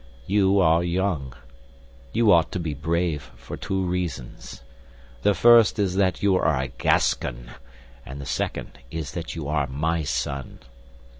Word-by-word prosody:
You 100 Hz, +1 st, +3 dB
are 85 Hz, -1 st, +4 dB
young. 85 Hz, -8 st, -1 dB, 0.8 s
You 115 Hz, -2 st, +3 dB
ought 85 Hz, -1 st, +4 dB
to 90 Hz, -, -2 dB
be 80 Hz, -3 st, -3 dB
brave 80 Hz, -1 st, -2 dB
for -, -, -8 dB
two 95 Hz, -1 st, -2 dB
reasons: 90 Hz, -9 st, -5 dB, 0.6 s
the 105 Hz, -, +3 dB
first 120 Hz, -2 st, +6 dB
is 100 Hz, -3 st, 0 dB
that 95 Hz, -2 st, +1 dB
you 100 Hz, -2 st, +4 dB
are 75 Hz, -6 st, +1 dB
a 65 Hz, -1 st, -2 dB
Gascon, -, -, 0 dB, 0.5 s
and 65 Hz, +2 st, -9 dB
the 70 Hz, -, -7 dB
second 65 Hz, -, -4 dB
is 80 Hz, -1 st, -5 dB
that 85 Hz, -3 st, -6 dB
you 80 Hz, -4 st, -5 dB
are 75 Hz, -2 st, 0 dB
my 80 Hz, +5 st, -1 dB
son. 70 Hz, -1 st, -3 dB
80 Hz, 150 wpm, -24 LUFS, 70-95 Hz, 0.8 s, first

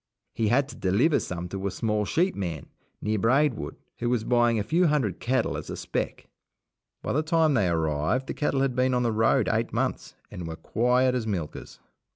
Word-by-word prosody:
He 110 Hz, -, 0 dB
had 135 Hz, +5 st, +3 dB
to -, -, -9 dB
deliver 115 Hz, -, +2 dB
some 90 Hz, 0 st, -5 dB
to 95 Hz, +1 st, -3 dB
a -, -, 0 dB
small 105 Hz, +2 st, -1 dB
sheep 180 Hz, -, +1 dB
man, 85 Hz, -7 st, -4 dB, 0.4 s
near 110 Hz, 0 st, 0 dB
Braidwood, 125 Hz, -, +1 dB, 0.2 s
who 120 Hz, -, -1 dB
was 120 Hz, -3 st, +1 dB
buying 120 Hz, -1 st, +3 dB
a 105 Hz, -, 0 dB
few 165 Hz, -, +2 dB
hundred 130 Hz, -, 0 dB
cattle 130 Hz, -1 st, 0 dB
as -, -, -6 dB
a -, -, -5 dB
spec. -, -, -4 dB, 0.8 s
By -, -, -2 dB
the 150 Hz, -, +2 dB
time 160 Hz, -1 st, +2 dB
they 105 Hz, -8 st, +2 dB
arrived, 80 Hz, -, 0 dB
the -, -, -4 dB
cattle 140 Hz, -2 st, 0 dB
had 135 Hz, -2 st, 0 dB
been 130 Hz, 0 st, +2 dB
on 125 Hz, -, +1 dB
the 120 Hz, -, +1 dB
road 110 Hz, +1 st, +2 dB
eight -, -, 0 dB
months, -, -, -2 dB, 0.2 s
and 90 Hz, -2 st, -6 dB
were 80 Hz, -, -5 dB
quiet 125 Hz, +7 st, +1 dB
as 120 Hz, -3 st, -2 dB
milkers. 85 Hz, -8 st, -5 dB
115 Hz, 200 wpm, -26 LUFS, 100-130 Hz, 0.8 s, had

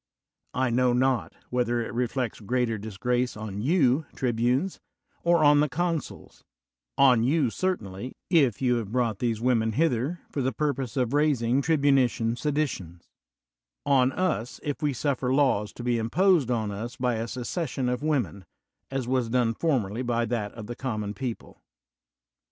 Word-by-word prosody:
I 130 Hz, -1 st, +1 dB
know 125 Hz, +1 st, +3 dB
not 130 Hz, 0 st, +1 dB, 0.2 s
whether 120 Hz, -1 st, +1 dB
it 115 Hz, -, -4 dB
reflects 125 Hz, -1 st, -2 dB
greater 115 Hz, 0 st, -1 dB
disgrace 120 Hz, +4 st, -1 dB
on 105 Hz, -2 st, -5 dB
you, 145 Hz, -, +2 dB
trib 120 Hz, -4 st, -1 dB
unes, 130 Hz, +10 st, +1 dB, 0.4 s
or 170 Hz, -2 st, +4 dB
on 145 Hz, 0 st, +6 dB
the 150 Hz, 0 st, +2 dB
consuls: 165 Hz, -1 st, -3 dB, 0.5 s
on 125 Hz, -4 st, +6 dB
you 135 Hz, -1 st, +2 dB
certainly, 125 Hz, -, -3 dB
if 140 Hz, -, +3 dB
you 125 Hz, -1 st, +3 dB
have 110 Hz, -3 st, -4 dB
brought 115 Hz, -4 st, 0 dB
these 115 Hz, -3 st, 0 dB
women 115 Hz, -2 st, +1 dB
hither 150 Hz, +3 st, 0 dB
for 140 Hz, -, -2 dB
the 130 Hz, +1 st, 0 dB
purpose 135 Hz, -6 st, -2 dB
of 125 Hz, -1 st, 0 dB
raising 140 Hz, -4 st, +2 dB
tribunitian 135 Hz, -6 st, +2 dB
seditions; 125 Hz, -, -3 dB, 0.8 s
on 130 Hz, -2 st, +4 dB
us, 155 Hz, -, -1 dB
if 145 Hz, -1 st, -3 dB
we 150 Hz, -1 st, +1 dB
suflPer 130 Hz, -1 st, 0 dB
laws 120 Hz, -8 st, +2 dB
to 120 Hz, -, -8 dB
be 120 Hz, -1 st, +1 dB
imposed 160 Hz, -, +3 dB
on 110 Hz, -4 st, 0 dB
us 115 Hz, +5 st, -5 dB
by 125 Hz, -2 st, 0 dB
a 115 Hz, +1 st, -3 dB
secession 130 Hz, +2 st, -3 dB
of 125 Hz, +1 st, -1 dB
women, 125 Hz, -, -1 dB, 0.5 s
as 135 Hz, -2 st, -3 dB
was 125 Hz, -2 st, 0 dB
done 120 Hz, -1 st, +2 dB
formerly 120 Hz, -7 st, 0 dB
by 120 Hz, -2 st, 0 dB
that 110 Hz, -3 st, -2 dB
of 115 Hz, -2 st, -8 dB
the 120 Hz, -, -6 dB
common 110 Hz, -6 st, -3 dB
people. 120 Hz, 0 st, -6 dB
125 Hz, 155 wpm, -26 LUFS, 115-140 Hz, 0.8 s, on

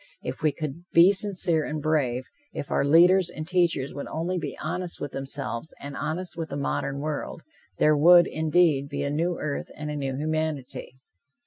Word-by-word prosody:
If -, -, -5 dB
we 155 Hz, -, +3 dB
could 155 Hz, +2 st, -6 dB
be 175 Hz, +4 st, +7 dB
sincere 185 Hz, -5 st, 0 dB
and 150 Hz, +1 st, -3 dB
brave; 140 Hz, -5 st, 0 dB, 0.3 s
if 140 Hz, -, -6 dB
our -, -, +2 dB
leaders 175 Hz, +5 st, +5 dB
and 155 Hz, 0 st, -7 dB
teachers 170 Hz, -6 st, +1 dB
would 140 Hz, -, -6 dB
only 175 Hz, +3 st, -2 dB
be -, -, -5 dB
honest 175 Hz, +3 st, -3 dB
with 145 Hz, -, -5 dB
themselves 135 Hz, -1 st, -5 dB
and 140 Hz, 0 st, -7 dB
honest 175 Hz, +3 st, -3 dB
with 165 Hz, -1 st, -5 dB
the 140 Hz, -, -4 dB
modern 140 Hz, -1 st, -2 dB
world, 150 Hz, +1 st, -4 dB, 0.3 s
there 155 Hz, 0 st, +4 dB
would, 175 Hz, +4 st, +7 dB
indeed, 155 Hz, -3 st, +2 dB
be 140 Hz, -, -3 dB
a 140 Hz, -, -1 dB
new 170 Hz, +4 st, 0 dB
earth 145 Hz, -2 st, -4 dB
and 150 Hz, 0 st, -5 dB
a -, -, -4 dB
new 135 Hz, -2 st, -3 dB
humanity. 155 Hz, -4 st, -3 dB
155 Hz, 185 wpm, -26 LUFS, 140-170 Hz, 0.3 s, be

